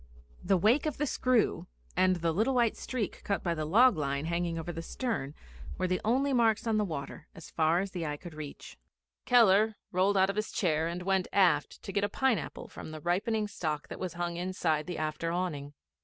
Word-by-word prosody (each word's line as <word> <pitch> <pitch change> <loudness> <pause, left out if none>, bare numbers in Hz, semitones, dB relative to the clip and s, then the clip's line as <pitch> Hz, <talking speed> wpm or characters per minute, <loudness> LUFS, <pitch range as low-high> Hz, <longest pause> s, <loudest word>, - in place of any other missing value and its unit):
The 190 +1 +3
wake 230 - +3
of 300 - -3
the 295 - 0
screw 255 -4 +1 0.3
and 185 0 +4
the 170 -1 0
little 220 +10 +1
white 235 -3 +3
streak 240 -6 -4
cut 200 - -1
by 170 - 0
the 155 -2 -3
log 225 +8 +5
line 140 0 -1
hanging 170 0 -1
over 165 +1 -4
the 165 - -5
stern 165 - -3 0.4
were - - 0
the 185 0 0
only 270 +5 +2
marks 225 -3 +3
on 225 -2 +1
the 210 - +2
water 155 -4 -6
as 165 - -11
far 165 +2 +2
as 195 0 -6
eye 155 -4 -3
could 175 +1 -10
reach. 150 - -9 0.5
Keller 220 -2 +5 0.2
rolled 190 +2 +2
out 190 +1 +4
of 200 - -10
his 215 - -2
chair 160 -4 +1
and 175 +1 -4
went 190 -1 +1
aft 175 -7 +2
to - - -5
get 200 0 0
a 205 - +1
pineapple 245 -4 -1
from - - -9
the 155 0 -7
ripening 210 +6 0
stock 155 -7 -4
that - - -7
was 185 -3 -4
hung 175 0 -3
inside 170 -4 -1
the 180 - -4
after 155 +2 -2
awning. 150 -5 -3
185 Hz, 210 wpm, -30 LUFS, 160-215 Hz, 0.5 s, log